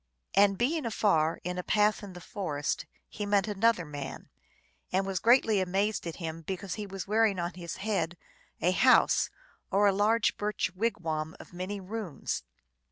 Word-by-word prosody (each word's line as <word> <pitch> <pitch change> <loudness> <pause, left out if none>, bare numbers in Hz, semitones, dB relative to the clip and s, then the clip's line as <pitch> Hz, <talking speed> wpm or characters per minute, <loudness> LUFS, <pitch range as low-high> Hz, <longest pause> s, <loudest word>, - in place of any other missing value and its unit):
And 195 0 +5
being 280 +2 0
afar, 165 -8 +2
in 180 +1 -3
a - - -3
path 210 +1 +2
in 200 -3 -9
the 180 - -10
forest, 155 -7 -3 0.2
he 210 - -6
met 200 -1 +3
an 205 0 -5
other 230 -7 +4
man, 145 -2 -7 0.6
and 190 +1 +1
was 195 -2 -1
greatly 230 -3 +4
amazed 195 +1 0
at 165 - -4
him 165 -2 -5
because 190 +2 -4
he 210 -1 -5
was 195 -1 -6
bearing 215 -1 +3
on 175 +1 -2
his 170 -2 -6
head 185 -5 -1 0.4
a 180 - +3
house, 255 +8 +5 0.4
or 200 +2 +3
a 200 - +5
large 210 +3 +2
birch 210 -2 -1
wig 225 +5 -1
wam 160 -1 -3
of - - -13
many 185 +3 -4
rooms. 195 -4 -4
195 Hz, 175 wpm, -30 LUFS, 175-210 Hz, 0.6 s, And